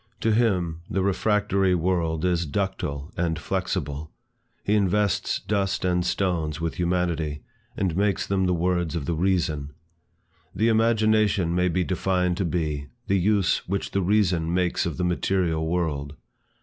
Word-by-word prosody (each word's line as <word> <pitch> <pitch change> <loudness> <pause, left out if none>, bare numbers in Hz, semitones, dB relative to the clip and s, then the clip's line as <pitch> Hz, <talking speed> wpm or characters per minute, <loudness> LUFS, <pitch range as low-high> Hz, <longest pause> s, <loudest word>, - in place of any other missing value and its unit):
To 110 - +2
him, 90 -8 +1
the 95 0 0
refractory 100 -1 +2
world 85 -2 0
is 85 -2 +1
ductile 75 -4 -3
and 80 -2 -1
flexible; 75 0 -3 0.5
he 105 - +1
invests 105 -1 +1
dust 100 -3 -1
and 90 -1 +1
stones 85 -4 -1
with 85 0 -2
humanity, 85 -4 -1 0.3
and 90 -4 0
makes 100 +1 +1
them 95 -1 +1
the 90 - +2
words 85 -1 0
of 80 -4 -2
the 85 - -1
Reason. 80 -5 0 0.8
The 110 +5 +2
Imagination 110 -5 +3
may 90 +1 +2
be 90 +1 +1
defined 90 -1 0
to 95 - 0
be, 75 -4 -2 0.2
the 100 0 +2
use 100 -1 +1
which 100 +2 -2
the 100 - 0
Reason 90 -4 +2
makes 90 -1 +1
of 80 - -4
the 90 - -1
material 90 -2 0
world. 75 -4 -2
90 Hz, 150 wpm, -25 LUFS, 80-95 Hz, 0.8 s, Imagination